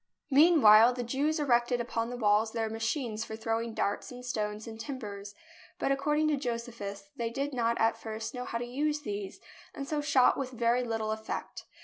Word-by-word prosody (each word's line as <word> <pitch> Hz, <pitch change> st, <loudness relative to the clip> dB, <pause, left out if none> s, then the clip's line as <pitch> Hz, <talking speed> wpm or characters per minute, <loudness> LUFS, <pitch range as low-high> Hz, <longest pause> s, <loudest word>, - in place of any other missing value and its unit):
Meanwhile 265 Hz, -7 st, +7 dB
the 245 Hz, -, -3 dB
Jews 285 Hz, +6 st, 0 dB
erected 245 Hz, -3 st, +2 dB
upon 230 Hz, -1 st, -2 dB
the 245 Hz, -, -5 dB
walls 215 Hz, 0 st, +2 dB
their 225 Hz, -2 st, -1 dB
machines 225 Hz, 0 st, -2 dB
for 220 Hz, -, -6 dB
throwing 225 Hz, 0 st, -2 dB
darts 200 Hz, -, -1 dB
and 250 Hz, 0 st, -9 dB
stones 210 Hz, -3 st, -3 dB
and 225 Hz, -1 st, -9 dB
tim 265 Hz, +4 st, -5 dB
bers, 205 Hz, -3 st, -8 dB, 0.4 s
but -, -, 0 dB
according 295 Hz, +3 st, +1 dB
to 295 Hz, -, +1 dB
Josephus, 235 Hz, -1 st, -5 dB
they 235 Hz, -1 st, -1 dB
did 275 Hz, +4 st, -3 dB
not 235 Hz, -2 st, 0 dB
at 225 Hz, 0 st, +2 dB
first 220 Hz, 0 st, -5 dB
know 250 Hz, -1 st, -5 dB
how 230 Hz, -, -3 dB
to 240 Hz, -, -4 dB
use 295 Hz, +4 st, -1 dB
these, 205 Hz, -6 st, -5 dB, 0.4 s
and 275 Hz, -, -5 dB
so 300 Hz, 0 st, -1 dB
shot 270 Hz, -3 st, +4 dB
with 265 Hz, -2 st, -2 dB
very 240 Hz, +1 st, +2 dB
little 225 Hz, -2 st, -2 dB
effect. 220 Hz, 0 st, -5 dB
235 Hz, 195 wpm, -30 LUFS, 220-265 Hz, 0.4 s, Meanwhile